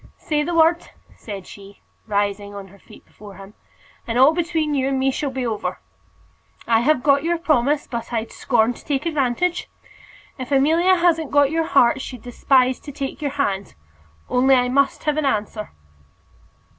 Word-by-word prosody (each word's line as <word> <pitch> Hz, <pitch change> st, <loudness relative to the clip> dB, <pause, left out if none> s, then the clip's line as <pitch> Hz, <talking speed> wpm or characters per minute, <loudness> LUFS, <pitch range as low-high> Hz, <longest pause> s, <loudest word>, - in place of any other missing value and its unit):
"Say 300 Hz, -1 st, -1 dB
the 335 Hz, +3 st, -2 dB
word," 330 Hz, +1 st, +3 dB, 0.3 s
said 200 Hz, -4 st, -8 dB
she, 200 Hz, 0 st, -14 dB, 0.3 s
rising 205 Hz, -1 st, -2 dB
on 195 Hz, -1 st, -9 dB
her 200 Hz, +2 st, -18 dB
feet -, -, -17 dB
before 205 Hz, -2 st, -14 dB
him, 195 Hz, +1 st, -13 dB, 0.5 s
"and 230 Hz, 0 st, -2 dB
all 270 Hz, +5 st, +6 dB
between 325 Hz, -3 st, -1 dB
you 265 Hz, -2 st, 0 dB
and 270 Hz, -1 st, 0 dB
me 265 Hz, +1 st, +1 dB
shall 285 Hz, +2 st, -3 dB
be 260 Hz, -1 st, -4 dB
over. 220 Hz, -3 st, -3 dB, 0.9 s
I 225 Hz, -1 st, +3 dB
have 260 Hz, +2 st, +1 dB
got 280 Hz, 0 st, +3 dB
your 340 Hz, +1 st, 0 dB
promise, 295 Hz, -3 st, +1 dB
but 235 Hz, -1 st, -6 dB
I'd 225 Hz, -1 st, -3 dB
scorn 240 Hz, -1 st, +1 dB
to -, -, -15 dB
take 285 Hz, 0 st, -2 dB
advantage. 320 Hz, +3 st, -1 dB, 0.7 s
If 255 Hz, +1 st, -7 dB
Amelia 325 Hz, +7 st, +3 dB
hasn't 330 Hz, -4 st, +1 dB
got 285 Hz, -1 st, +3 dB
your 325 Hz, 0 st, 0 dB
heart, 265 Hz, -3 st, +3 dB
she'd 250 Hz, -4 st, -8 dB
despise 255 Hz, +1 st, +2 dB
to 290 Hz, -, -10 dB
take 275 Hz, +1 st, -6 dB
your 290 Hz, -, -1 dB
hand. 200 Hz, -9 st, -2 dB, 0.5 s
Only 265 Hz, +2 st, +3 dB
I 250 Hz, -1 st, +1 dB
must 275 Hz, +2 st, +1 dB
have 300 Hz, -1 st, 0 dB
an 310 Hz, -, 0 dB
answer." 215 Hz, -3 st, -2 dB
270 Hz, 175 wpm, -21 LUFS, 230-300 Hz, 0.9 s, all